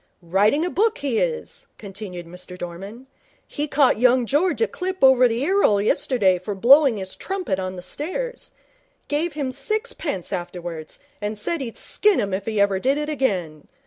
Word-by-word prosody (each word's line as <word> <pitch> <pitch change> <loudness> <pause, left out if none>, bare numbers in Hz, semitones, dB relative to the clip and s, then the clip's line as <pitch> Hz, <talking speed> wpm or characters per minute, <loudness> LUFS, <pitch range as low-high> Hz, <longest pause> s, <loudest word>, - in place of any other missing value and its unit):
'Writing 205 - +2
a - - -1
book 435 +2 +1
he 270 -5 -1
is,' 475 -1 -3
continued 195 -4 -8
Mr 180 +1 -10
Dorman. 195 +8 -8 0.4
'He 295 +1 -3
caught 275 -5 +3
young 250 0 +4
George 305 +9 +1
a 455 - +2
clip 375 -3 -5
over 260 -1 +7
the 235 +2 -2
ear 390 +6 +2
'ole 205 -1 +4
yesterday 200 -3 +2
for 200 +3 -5
blowing 265 +3 +6
his 190 -1 -5
trumpet 370 - -3
on 185 0 -4
the 180 - -8
stairs. 370 - -4 0.6
Gave 305 +3 -1
him 280 -3 -3
sixpence 325 - -2
afterwards, 175 -3 -6 0.2
and 210 +1 -3
said 305 +9 -2
he'd 235 -4 -6
skin 415 -6 +2
him 200 -4 -1
if 195 +2 -3
he 215 -2 -1
ever 200 -1 +2
did 270 +6 +1
it 300 0 -3
again. 180 - -2
240 Hz, 175 wpm, -22 LUFS, 190-300 Hz, 0.6 s, over